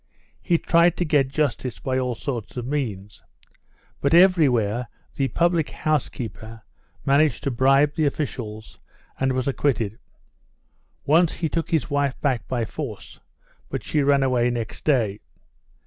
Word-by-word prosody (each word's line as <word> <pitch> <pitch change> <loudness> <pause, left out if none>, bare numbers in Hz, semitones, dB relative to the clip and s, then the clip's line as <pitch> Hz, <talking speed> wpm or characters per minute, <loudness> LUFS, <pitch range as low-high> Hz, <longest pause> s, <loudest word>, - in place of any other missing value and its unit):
He 175 -3 +2
tried 170 +1 +3
to 175 - 0
get 145 -4 +2
justice 135 -4 -2
by 130 -1 -2
all 125 -2 -1
sorts 120 -1 -5
of 120 - -3
means. 110 -8 -4 0.8
But 140 +4 +2
everywhere 125 - +4 0.3
the 135 - 0
public 170 +1 +1
house 155 -3 -1
keeper 110 0 -8 0.4
managed 140 -1 +2
to 140 - 0
bribe 135 +4 +3
the 155 -1 +1
officials, 110 -7 -5 0.4
and 130 0 +1
was 130 0 -1
acquitted. 120 -6 0 1.1
Once, 160 +3 +4
he 160 - -2
took 165 +1 -2
his 160 -2 0
wife 145 -2 0
back 130 -6 -1
by 120 -3 -1
force, 110 -3 -7 0.5
but - - -4
she 150 - 0
ran 140 -1 +3
away 125 -2 +2
next 115 -3 -5
day. 115 -9 +1
135 Hz, 145 wpm, -23 LUFS, 120-150 Hz, 1.1 s, everywhere